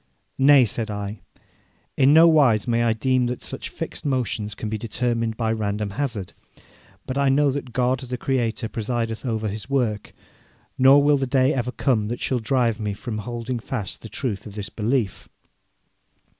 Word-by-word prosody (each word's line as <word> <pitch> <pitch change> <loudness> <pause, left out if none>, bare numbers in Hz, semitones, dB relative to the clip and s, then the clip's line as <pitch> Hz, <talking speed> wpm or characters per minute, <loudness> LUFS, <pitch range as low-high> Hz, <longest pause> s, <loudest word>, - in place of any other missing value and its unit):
'Nay,' 135 -1 +7
said 110 +1 -3
I, 105 0 -5 0.8
'in 135 +1 +5
no 160 +2 +8
wise 135 -10 +4
may 120 0 +2
I 115 -1 +3
deem 125 +2 +1
that 125 0 -4
such - - -5
fixed - - -6
motions 115 -6 -1
can 110 - -5
be 110 0 -3
determined 115 0 -1
by 115 -1 0
random 105 -1 -2
hazard, 115 -5 -3 0.7
but 130 +2 -3
I 140 -1 +3
know 140 +1 +3
that 135 -2 -5
God, 125 +2 +1
the 125 -1 -5
Creator, 115 -3 -1
presideth 115 +1 -3
over 110 -2 -1
His 105 +4 -5
work, 120 -7 -1 0.6
nor 135 +2 +6
will 145 0 +4
the 135 -1 -1
day 130 +2 +3
ever 125 -1 -2
come 120 -6 0
that 120 +2 -4
shall 130 - -1
drive 120 -2 +1
me 105 -2 -3
from 110 0 -5
holding 120 +3 -4
fast 110 -4 -5
the 115 - -9
truth 110 -6 -4
of 100 - -11
this 105 0 -5
belief.' 115 -2 -2
120 Hz, 175 wpm, -23 LUFS, 110-130 Hz, 0.8 s, no